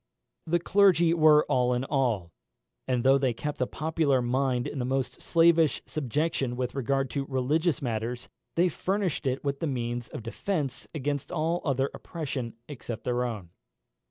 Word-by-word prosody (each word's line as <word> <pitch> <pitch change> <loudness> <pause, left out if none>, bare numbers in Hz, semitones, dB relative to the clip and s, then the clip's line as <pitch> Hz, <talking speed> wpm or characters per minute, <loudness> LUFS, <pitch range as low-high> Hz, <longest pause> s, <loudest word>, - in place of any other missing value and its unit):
The 170 +2 +3
clergy 175 -2 +4
were 155 -2 +6
all 125 -3 +2
in 125 - -1
all; 120 - 0 0.6
and 125 -2 +1
though 135 +1 +5
they 130 -3 +1
kept 150 +5 -4
the 125 - +1
popular 155 -3 +1
mind 125 0 0
in 140 - -4
the - - 0
most 130 +1 -2
slavish 165 -2 +4
subjection 140 -2 -1
with 125 0 -2
regard 135 0 0
to 140 -2 -2
religious 145 +4 +1
matters, 120 +1 -3 0.3
they 175 +2 +4
furnished 185 -3 -1
it 130 +1 -1
with 140 -1 -2
the 165 - -1
means 120 -3 -3
of - - -8
defence 140 - -3
against 145 0 -2
all 165 0 0
other 135 -2 0
oppression 135 -8 -5
except 120 -5 -7
their 125 0 0
own. 105 -8 -5
135 Hz, 160 wpm, -28 LUFS, 125-155 Hz, 0.6 s, were